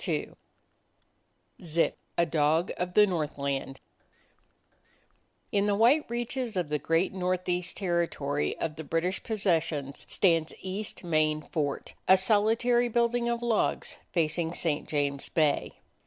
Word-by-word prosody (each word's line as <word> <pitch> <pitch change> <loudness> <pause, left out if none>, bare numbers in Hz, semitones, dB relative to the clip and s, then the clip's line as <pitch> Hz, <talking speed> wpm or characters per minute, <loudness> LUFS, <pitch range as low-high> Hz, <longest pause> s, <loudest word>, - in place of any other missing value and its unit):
26 - - -2 1.3
ZIP: 165 0 +1 0.2
A 170 - +4
DOG 160 +2 +1
OF 180 0 -3
THE 210 - +8
NORTHLAND 140 -6 -3
I - - -21
N 200 0 +3
the 205 - +2
white 245 +8 +4
reaches 240 -1 -3
of 175 -5 -1
the 150 0 0
great 165 +6 +1
Northeast 180 -1 -1
Territory 170 -6 -1
of 155 -2 -3
the 160 - -5
British 165 +6 -1
possessions 165 -9 -1
stands 165 -4 +2
East 190 +3 -5
Main 155 -2 +1
Fort, 145 -3 -3
a 190 - +8
solitary 225 +5 +3
building 235 +1 +1
of 235 0 -2
logs, 235 -2 0
facing 165 0 0
St. 155 -3 -2
James 140 -2 -1
Bay. 155 -3 0
175 Hz, 125 wpm, -28 LUFS, 155-210 Hz, 1.3 s, THE